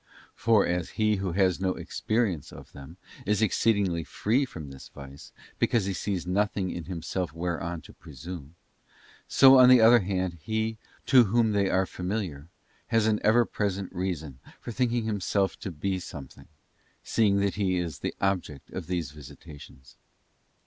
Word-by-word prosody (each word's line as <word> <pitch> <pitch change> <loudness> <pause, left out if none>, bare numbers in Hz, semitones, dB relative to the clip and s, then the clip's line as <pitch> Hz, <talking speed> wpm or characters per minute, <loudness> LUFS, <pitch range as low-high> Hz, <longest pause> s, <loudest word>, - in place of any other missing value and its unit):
For 110 -3 +3
as 90 -1 -1
he 105 -1 +2
who 95 -3 -3
has 95 -1 +2
no 95 -1 0
experience 110 - -2
of - - -12
them, 70 -1 -12 0.3
is 105 +3 +1
exceedingly 100 -5 +1
free 120 - 0
from 80 - -9
this 65 - -11
vice, 70 -1 -12 0.3
because 115 -5 +2
he 100 - -2
sees 95 -1 -3
nothing 95 0 0
in 85 - -6
himself 90 -1 -4
whereon 85 0 -3
to - - -15
presume; 80 +2 -10 0.7
so 135 -1 +7
on 125 0 +8
the 130 -1 +8
other 115 +2 +7
hand 90 -3 -2
he, 110 +4 -2 0.3
to 130 -3 +6
whom 110 +2 +2
they 100 -2 +1
are 95 0 +2
familiar, 90 -6 -4 0.4
has 115 -1 +2
an 110 -1 +2
ever 115 +3 +4
present 100 -3 -3
reason 80 -8 -4 0.2
for - - -7
thinking 120 0 0
himself 100 -2 0
to - - -5
be 95 +3 -3
something, 75 -6 -10 0.6
seeing 105 -3 +2
that 100 -1 +1
he 95 -3 0
is 85 -6 -3
the - - -4
object 90 -8 -2
of - - -6
these 85 -6 -2
visitations. 75 -2 -13
95 Hz, 160 wpm, -27 LUFS, 85-110 Hz, 0.7 s, on